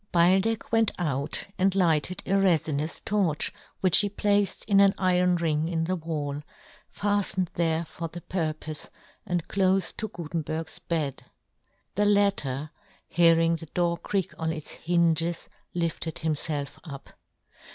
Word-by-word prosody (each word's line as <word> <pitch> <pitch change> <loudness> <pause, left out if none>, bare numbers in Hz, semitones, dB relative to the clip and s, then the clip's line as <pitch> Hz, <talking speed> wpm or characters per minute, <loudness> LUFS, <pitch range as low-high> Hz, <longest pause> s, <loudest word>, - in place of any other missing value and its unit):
Beildech 190 +6 +3
went 225 -1 +4
out 145 -3 -1
and 190 0 +3
lighted 175 -1 +2
a - - -4
refinous 160 -5 +1
torch, 190 -8 0 0.3
which 185 -3 +6
he 205 - +3
placed 205 -1 0
in 200 -2 +4
an 200 -1 +5
iron 180 -1 +3
ring 160 -2 0
in 165 -1 -1
the 185 +3 0
wall, 150 -4 -4 0.5
fattened 200 -3 0
there 165 -1 0
for 165 +1 -6
the 175 +2 -9
pur 165 -4 -1
pofe, 155 0 -7 0.4
and 175 -3 -1
clofe 190 -1 +1
to 220 - -2
Gutenberg's 165 -2 -5
bed. 160 -5 -3 0.7
The 205 +2 +1
latter 195 -9 +2 0.4
hearing 165 0 +4
the 165 - -10
door 170 +2 0
creak 190 +1 -2
on 160 0 0
its 155 -2 -6
hinges 170 0 +1 0.3
lifted 165 -2 -2
himfelf 150 0 -3
up. 140 -5 -9
170 Hz, 140 wpm, -27 LUFS, 160-190 Hz, 0.7 s, which